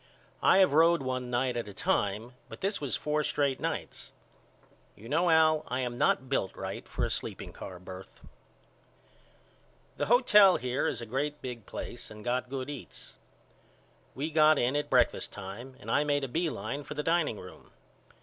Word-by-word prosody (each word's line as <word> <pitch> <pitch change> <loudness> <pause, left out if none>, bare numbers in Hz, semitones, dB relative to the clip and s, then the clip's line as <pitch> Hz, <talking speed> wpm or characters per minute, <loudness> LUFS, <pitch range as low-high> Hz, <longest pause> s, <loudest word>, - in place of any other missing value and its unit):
I - - +5
have 190 -7 +5
road 165 -1 +5
one 130 -1 -3
night 125 0 0
at 120 -2 -3
a 100 - -10
time 105 +6 -1 0.2
but - - -10
this 200 -1 -1
was 140 -4 -1
four 150 0 0
straight 140 -2 0
nights. - - -4 0.8
You 110 - -13
know 165 +7 +2
Al 155 -1 +4
I 125 +2 -1
am 120 -1 -3
not 120 +2 +2
built 130 -8 -1
right - - -6
for - - -2
a - - -3
sleeping - - -4
car 90 - -8
birth. 95 +1 -11 1.8
The - - -1
hotel 210 -5 +6
here 125 +2 -1
is - - -2
a - - -5
great 145 +6 -2
big 120 -4 -7
place 120 - -7
and 105 +1 -11
got 125 +1 -1
good 130 -1 -4
eats. 145 -3 -10 1.0
We 150 +4 -3
got 155 0 +5
in 125 +2 +1
at 145 - -1
breakfast 125 -2 +2
time 105 +7 -8
and - - -6
I 145 - +3
made 145 -1 0
a - - -1
B 165 +6 0
line 120 +5 -4
for 150 - -8
the 150 - -2
dining 165 -9 +1
room. 90 - -12
135 Hz, 180 wpm, -30 LUFS, 120-155 Hz, 1.8 s, hotel